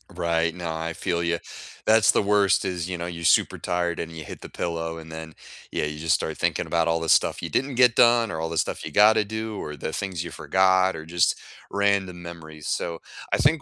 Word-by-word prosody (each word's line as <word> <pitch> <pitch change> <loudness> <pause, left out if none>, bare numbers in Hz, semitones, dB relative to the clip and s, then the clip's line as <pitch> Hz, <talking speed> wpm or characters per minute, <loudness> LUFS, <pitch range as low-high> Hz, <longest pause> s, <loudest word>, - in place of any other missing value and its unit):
Right, 85 -1 0
no 85 -2 -4
I 80 +1 -4
feel 85 -1 -2
you. 85 0 0 0.5
That's 110 0 +5
the - - +2
worst 100 -1 +3
is, 90 -2 -3
you 90 - -3
know, 85 - -4
you 85 -1 -7
super - - +3
tired 85 -1 -2
and 85 - -4
you 80 -1 -8
hit - - -9
the - - -8
pillow 80 -1 -3
and 80 0 -10
then, 80 0 -8 0.4
yeah, - - -1
you 75 0 -5
just 80 +1 +2
start - - -3
thinking - - 0
about 85 -1 +1
all 85 0 +1
the 80 - -3
stuff - - +3
you - - -4
didn't 135 0 -1
get 125 -1 +5
done 120 -2 +5
or 80 - -4
all 80 - -2
the 85 - -4
stuff - - -1
you - - -6
gotta 110 +1 +5
do 110 0 -4
or 75 - -6
the 75 - -5
things 95 -4 -3
you 85 - -7
forgot 95 +1 +2
or 80 - -7
just 85 +1 +2 0.3
random 100 -3 0
memories, 80 -3 -9
so 85 -1 -2 0.3
I - - +4
think 145 +5 +3
85 Hz, 235 wpm, -25 LUFS, 80-100 Hz, 0.5 s, That's